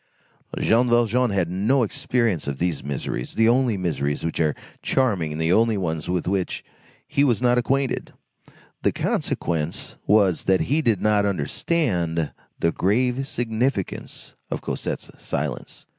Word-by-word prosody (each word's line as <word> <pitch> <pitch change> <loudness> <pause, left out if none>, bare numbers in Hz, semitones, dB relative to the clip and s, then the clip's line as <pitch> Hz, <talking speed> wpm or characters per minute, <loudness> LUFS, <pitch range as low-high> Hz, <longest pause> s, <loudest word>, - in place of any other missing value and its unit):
Jean 120 +2 +3
Valjean 120 +1 +3
had 95 -4 +1
no 105 +9 +2
experience 115 - 0
of 70 -1 -2
these 85 -2 -1
miseries, 70 -3 -4
the 115 0 +4
only 120 -2 +3
miseries 75 -5 -1
which 80 - -2
are 75 -3 +2 0.3
charming 100 - +1
and 75 - -5
the 80 +2 +2
only 110 0 +3
ones 80 -4 -2
with 90 -1 -1
which 95 -1 -1 0.4
he 145 -1 +2
was 125 -6 +3
not 125 0 +3
acquainted; 135 +2 0 0.7
the - - +2
consequence 80 -1 -2
was 100 -4 +3
that 95 -1 +3
he 150 +5 +1
did 115 - +1
not 105 -1 +3
understand 90 - 0 0.3
the 85 - +1
grave 125 +9 +1
significance 115 -3 -2 0.2
of - - -2
Cosette's - - -4
silence. - - -4
100 Hz, 145 wpm, -24 LUFS, 85-120 Hz, 0.7 s, the